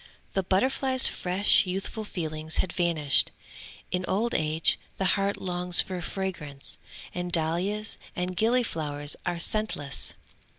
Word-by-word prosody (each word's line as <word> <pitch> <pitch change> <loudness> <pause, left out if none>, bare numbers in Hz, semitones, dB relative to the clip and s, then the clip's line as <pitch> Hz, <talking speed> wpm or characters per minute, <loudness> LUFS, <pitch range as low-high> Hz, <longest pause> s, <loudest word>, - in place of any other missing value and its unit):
The 195 - +2
butterfly's 260 +7 +3
fresh 185 +2 +4
youthful 195 +4 -3
feelings 160 -4 -4
had 185 - 0
vanished. 160 -6 +2 0.6
In 180 0 0
old 225 +5 0
age, 155 +1 +1 0.2
the 190 - 0
heart 200 0 0
longs 180 -1 0
for 185 -2 +3
fragrance, 170 -8 -5 0.3
and 175 0 -3
dahlias 180 +6 0 0.2
and 180 +1 -2
gillyflowers 165 -11 +1
are 175 0 0
scentless. 170 -6 -1
180 Hz, 120 wpm, -27 LUFS, 160-200 Hz, 0.6 s, fresh